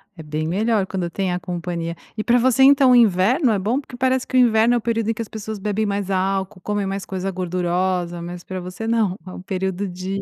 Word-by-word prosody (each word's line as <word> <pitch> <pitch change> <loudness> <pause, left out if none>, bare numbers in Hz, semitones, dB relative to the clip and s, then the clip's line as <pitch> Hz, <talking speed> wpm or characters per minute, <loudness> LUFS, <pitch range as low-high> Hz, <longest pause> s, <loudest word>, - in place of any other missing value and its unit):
É 165 - -9
bem 155 +1 -3
melhor 205 +3 +1
quando 185 -3 -3
tem 185 +1 -2
a 180 - -2
companhia. 170 -1 -4 0.2
E 215 - -3
pra 245 +1 +4
você 255 +1 +3
então 275 -1 +6
o 250 - +7
inverno 230 - +4
é 210 - +2
bom, 215 +8 0
porque 245 - -12
parece 260 0 +1
que 255 - 0
o - - +7
inverno 235 0 +4
é - - +3
o 235 - -3
período 230 -1 -1
em - - +2
que 225 - -6
as - - -12
pessoas 220 0 -6
bebem 210 +2 -1
mais 200 -1 -2
álcool, 190 0 -1
comem 205 +1 -2
mais 195 0 -3
coisa 190 0 -3
gordurosa, 180 -1 -1
mas 175 +1 -7
pra 185 0 -5
você 180 +5 -7
não, 215 -5 +1
é 185 - -8
o - - -8
período 190 +1 -2
de 185 +2 -4
195 Hz, 245 wpm, -21 LUFS, 180-225 Hz, 0.2 s, o